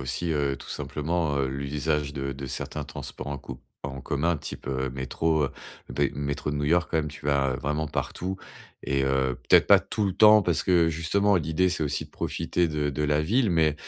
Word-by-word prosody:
aussi, 70 +6 -2
heu, 70 -2 0
tout - - -11
simplement, 80 -1 -1
heu, 65 -1 +1
l'usage 70 +2 -2
de 70 -1 -3
de 70 0 -6
certains - - -4
transports 65 - -7
en 70 0 -3
co 65 -2 -9 0.2
en 70 0 -5
commun, 80 +6 0
type, 70 - -7
heu, 65 -1 -1
métro, 75 +5 0
heu - - -6 0.4
des 70 +3 0
métros 70 +1 -3
de 75 - -2
New-York. 80 +3 +2
Quand 80 - 0
même, 75 -1 -1
tu 70 0 -9
vas 70 -2 +2
vraiment 75 +3 -2
partout 95 +6 -3 0.5
et 70 0 +1
heu, 65 -2 +1
peut-être - - +6
pas - - +9
tout 105 - -2
le 95 - 0
temps 105 +2 +7
parce 85 -3 +1
que 85 -3 +4
justement, 100 +6 +2
l'idée, 80 +3 +1
c'est 90 -3 -1
aussi 75 -1 -1
de - - -17
profiter 85 -2 -1
de 75 -1 -1
de 75 +2 -3
la 75 0 +2
ville, 115 +5 +2
mais 80 -3 +3
75 Hz, 210 wpm, -26 LUFS, 70-85 Hz, 0.5 s, pas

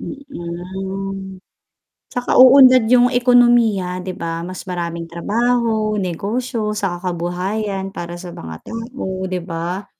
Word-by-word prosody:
Mm. 190 - -6 0.7
Tsaka 245 0 -3
uunlad 255 -1 +8
'yung 245 -1 +6
ekonomiya 240 -5 +4 0.2
'di 185 +1 -5
ba, 170 - -4 0.2
mas 185 0 -7
maraming 170 -1 -4
trabaho, 220 +4 0
negosyo, 230 +8 -3 0.2
saka 180 -3 -1 0.2
kabuhayan 190 +3 -3
para 170 0 -5
sa 180 0 -8
mga 80 -1 -8
tao, 230 +3 -7 0.3
'di 185 -1 -2
ba? 175 +3 -4
195 Hz, 115 wpm, -19 LUFS, 175-240 Hz, 0.7 s, uunlad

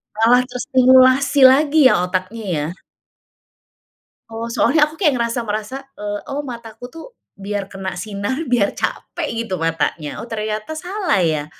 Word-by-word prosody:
Malah 235 +3 +4
terstimulasi 260 +2 +4
lagi 280 +1 +6
ya, - - +4
otaknya, 185 +5 -4
ya. 150 -1 -1 1.6
Oh, 225 +1 -5
soalnya 300 +6 +2
aku 305 - -13
kayak 315 -5 +2
ngerasa 235 +1 -1
merasa, 215 +3 -4 0.2
eee, 205 0 -3
"Oh, 285 - -2
mataku 235 -4 -9
tuh, 325 +5 -11 0.3
biar 200 0 -4
kena 195 -1 -6
sinar, 205 +4 -3 0.2
biar 210 -5 +3
capek, 340 -3 -4 0.2
gitu, 190 - -4
matanya." 165 -2 -2
Oh, - - -6
ternyata 215 +4 -4
salah, 360 - -1
ya? 155 -4 0
230 Hz, 140 wpm, -19 LUFS, 200-265 Hz, 1.6 s, lagi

